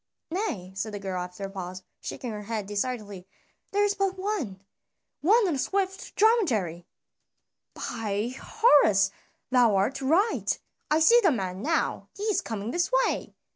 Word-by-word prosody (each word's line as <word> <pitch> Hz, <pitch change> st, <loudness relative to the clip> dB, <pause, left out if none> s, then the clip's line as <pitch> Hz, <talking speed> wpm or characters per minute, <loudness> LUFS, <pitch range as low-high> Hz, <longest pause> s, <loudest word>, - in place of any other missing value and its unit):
"Nay," 235 Hz, -, -3 dB
said 210 Hz, +2 st, -3 dB
the -, -, -4 dB
girl 190 Hz, -2 st, -3 dB
after 180 Hz, +2 st, -7 dB
a 195 Hz, -, -3 dB
pause, 185 Hz, -1 st, -6 dB, 0.2 s
shaking 245 Hz, -, -5 dB
her 210 Hz, -1 st, -5 dB
head 220 Hz, -2 st, -3 dB
decidedly; 205 Hz, -3 st, -4 dB, 0.4 s
"there 410 Hz, +1 st, +2 dB
is 410 Hz, 0 st, +2 dB
but 390 Hz, -1 st, -1 dB
one 370 Hz, -, -3 dB, 0.6 s
one 415 Hz, +6 st, +4 dB
on 345 Hz, -, +1 dB
a 275 Hz, -, -2 dB
swift 385 Hz, +4 st, -2 dB
dromedary." 230 Hz, -, +2 dB, 0.9 s
"By 220 Hz, +1 st, -3 dB
Horus! 240 Hz, -, +4 dB, 0.4 s
thou 245 Hz, -5 st, +5 dB
art 195 Hz, +9 st, +1 dB
right, 340 Hz, +12 st, +2 dB, 0.3 s
I 310 Hz, +1 st, +3 dB
see 470 Hz, +9 st, +7 dB
the 380 Hz, -, +5 dB
man 190 Hz, -6 st, -3 dB
now, 320 Hz, +5 st, 0 dB
he 405 Hz, -, -5 dB
is 425 Hz, -2 st, +1 dB
coming 220 Hz, 0 st, -4 dB
this 350 Hz, -, 0 dB
way." -, -, -3 dB
240 Hz, 155 wpm, -27 LUFS, -, 0.9 s, see